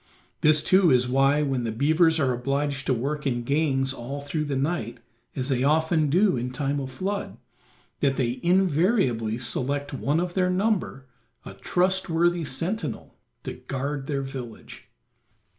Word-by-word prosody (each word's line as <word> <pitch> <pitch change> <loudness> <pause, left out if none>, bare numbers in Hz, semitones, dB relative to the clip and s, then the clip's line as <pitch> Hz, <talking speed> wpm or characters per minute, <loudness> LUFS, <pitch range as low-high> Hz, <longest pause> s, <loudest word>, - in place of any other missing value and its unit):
This 155 0 +4
too 185 -2 +4
is 125 -2 +3
why, 135 +3 +3
when 135 -4 -1
the 115 - -2
beavers 160 +7 +3
are 130 -4 +2
obliged 140 +2 -2
to - - +2
work 145 +5 -2
in 120 -2 -1
gangs 135 -1 +1
all 135 +3 -6
through 150 +2 -3
the 145 -2 -2
night, 135 -5 -2 0.4
as 130 0 -3
they 130 -2 +1
often 155 +1 +2
do 185 +3 +3
in 125 +1 -2
time 140 +2 -2
of 135 -1 -5
flood, 195 +9 -4 0.6
that 135 -2 +1
they 125 -1 -1
invariably 170 - +2
select 140 +4 -2
one 145 +3 0
of 175 0 -2
their 185 -1 +1
number, 185 -8 -1 0.4
a - - -8
trustworthy 175 -2 +1
sentinel, 155 - -3 0.3
to - - -5
guard 135 +1 -4
their 140 -2 -2
village. 130 -4 -9
140 Hz, 155 wpm, -25 LUFS, 130-165 Hz, 0.6 s, This